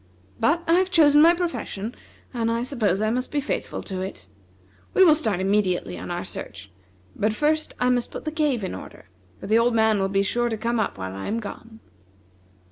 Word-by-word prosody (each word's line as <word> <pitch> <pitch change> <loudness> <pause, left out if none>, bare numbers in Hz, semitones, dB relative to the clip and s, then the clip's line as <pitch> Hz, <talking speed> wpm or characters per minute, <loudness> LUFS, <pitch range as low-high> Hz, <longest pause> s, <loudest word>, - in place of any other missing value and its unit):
But 335 +2 +2
I 330 - +4
have 375 0 +1
chosen 295 -5 +6
my 335 +2 +7
profession, 250 - -4 0.4
and 230 -2 -1
I 230 +1 0
suppose 215 -7 0
I 215 - +1
must 250 +2 -2
be 295 - 0
faithful 285 - -3
to 190 -2 -5
it. 190 - -7 0.7
We 380 - +7
will 330 -4 +7
start 220 - 0
immediately 190 -1 0
on - - -7
our 175 0 -3
search; 100 -1 -8 0.4
but 215 +1 0
first 310 +3 0
I 250 0 +3
must 245 -1 0
put - - -8
the 310 - -2
cave 295 -8 0
in 190 - -3
order, 90 - -11 0.3
for - - -9
the 220 +3 +3
old 235 0 +2
man 220 -2 +3
will 195 0 0
be 195 0 +2
sure 240 +4 0
to 220 - -2
come 235 +2 -1
up 210 - -1
while 95 0 -5
I 95 0 -6
am 225 +2 -1
gone." 225 +1 -9
230 Hz, 210 wpm, -24 LUFS, 195-290 Hz, 0.7 s, my